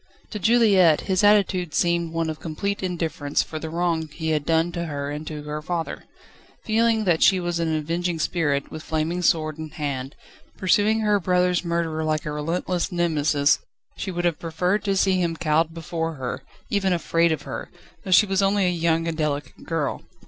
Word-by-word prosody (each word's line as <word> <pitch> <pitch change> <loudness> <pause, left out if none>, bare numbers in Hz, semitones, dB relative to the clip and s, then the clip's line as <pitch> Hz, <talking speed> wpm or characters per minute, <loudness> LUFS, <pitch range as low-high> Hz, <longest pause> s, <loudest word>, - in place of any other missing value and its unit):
To 210 - -4
Juliette 195 -7 +5
his 190 0 0
attitude 195 -5 +3
seemed 170 -1 +1
one 165 0 -1
of 155 - -8
complete 200 +5 -3
indifference 165 -5 -1
for 155 - -6
the 160 - -5
wrong 165 -1 -1
he 160 +2 -5
had 150 -2 -1
done 165 +1 +2
to 170 0 -3
her 145 -2 -4
and 150 +1 -6
to 150 -1 -6
her 150 0 -5
father: 165 +1 -4 0.6
feeling 225 0 +2
that 175 -5 +2
she 190 - +5
was 175 -1 -2
an 160 -1 0
avenging 170 +3 -1
spirit, 150 -3 -1
with 155 - -7
flaming 160 +3 -2
sword 155 -2 +1
in 155 0 -5
hand, 140 -3 -4 0.4
pursuing 210 +4 +2
her 210 -1 +2
brother's 180 -1 +1
murderer 170 -2 -1
like 155 -1 -1
a 150 - -3
relentless 170 +4 -2
Nemesis, 155 -4 +2 0.4
she 195 - -5
would 175 -1 -2
have 170 -3 +1
preferred 180 +5 -1
to 195 -1 +1
see 190 -1 +2
him 170 -1 0
cowed 160 0 +1
before 165 0 -4
her, 130 -3 -4 0.3
even 195 -3 +2
afraid 170 -1 +2
of 150 -2 -2
her, - - -6 0.3
though 195 - -7
she 185 +3 +6
was 195 -1 +1
only 195 0 +2
a - - +3
young 165 -1 +1
and 165 - -2
delicate 150 -2 -3
girl. 165 -4 -2
165 Hz, 190 wpm, -24 LUFS, 155-180 Hz, 0.6 s, she